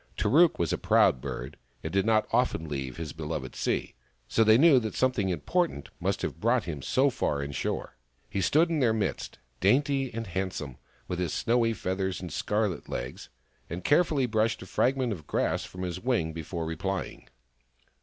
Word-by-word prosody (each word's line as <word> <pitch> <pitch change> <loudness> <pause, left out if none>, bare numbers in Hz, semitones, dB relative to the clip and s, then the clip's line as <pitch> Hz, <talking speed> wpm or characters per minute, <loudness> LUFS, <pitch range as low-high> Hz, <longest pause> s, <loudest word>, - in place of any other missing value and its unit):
Tarook 155 +10 +4
was 85 -2 0
a - - -1
proud 65 - +4
bird, - - -6 0.3
and - - -4
did 100 +2 +2
not 110 -1 +3
often 125 -10 +1
leave 65 -3 -4
his 80 -4 -5
beloved 75 -5 -5
sea; - - -1 0.3
so 115 - +3
they 110 0 +6
knew 145 -1 +7
that 110 -3 -4
something 125 -7 +1
important 90 - -1
must - - -1
have - - -3
brought 120 +1 +2
him 75 -5 -5
so 135 - +2
far 70 - -1
inshore. 70 0 -3 0.3
He 100 - -2
stood 160 - +3
in 160 - +1
their 120 -5 +3
midst, 110 - -2 0.2
dainty 135 +5 +2
and 115 0 -4
handsome, 90 - -4 0.3
with 90 - -3
his 90 -4 -1
snowy 115 -1 +2
feathers 95 -2 -2
and 90 -4 -7
scarlet 105 -3 -1
legs, - - -5 0.4
and 85 +2 -5
care 150 +5 +5
fully 145 -6 0
brushed 110 -1 0
a - - -9
fragment 130 -2 +1
of 80 -6 -10
grass - - 0
from 90 0 -7
his 90 0 -3
wing 110 -9 0
before 80 +1 -4
replying. 95 +5 -4
100 Hz, 180 wpm, -28 LUFS, 80-125 Hz, 0.4 s, knew